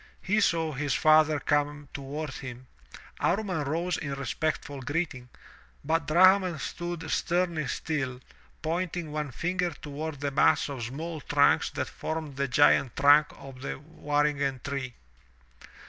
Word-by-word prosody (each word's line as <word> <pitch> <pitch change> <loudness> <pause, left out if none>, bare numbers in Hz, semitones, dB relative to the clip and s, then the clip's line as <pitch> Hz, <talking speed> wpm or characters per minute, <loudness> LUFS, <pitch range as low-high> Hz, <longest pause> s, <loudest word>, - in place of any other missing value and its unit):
he 210 +3 +2
saw 165 -4 +2
his 140 -2 -1
father 155 -1 +5
come 145 0 0
toward 140 +2 -5
him. 130 -2 -8 0.5
Amman 185 -5 0
rose 165 +5 -1
in 140 -2 -4
respectful 140 +1 -3
greeting, 140 -4 -3 0.6
but 160 0 0
Drahman 185 +1 +5
stood 175 +4 -5
stemly 170 -4 0
still, 135 -5 -2 0.4
pointing 170 0 -2
one 150 -1 -3
finger 180 +7 -1
toward 150 -1 -6
the 140 0 -2
mass 140 - +3
of 135 -4 -5
small 155 +7 -5
tmnks - - +3
that - - -2
formed 160 -3 -5
the 140 +1 0
giant 130 -1 +4
tmnk 145 +2 +5
of 135 -2 -11
the 140 - -4
waringen 145 -3 -1
tree. 135 -3 -4
150 Hz, 130 wpm, -28 LUFS, 140-165 Hz, 0.6 s, father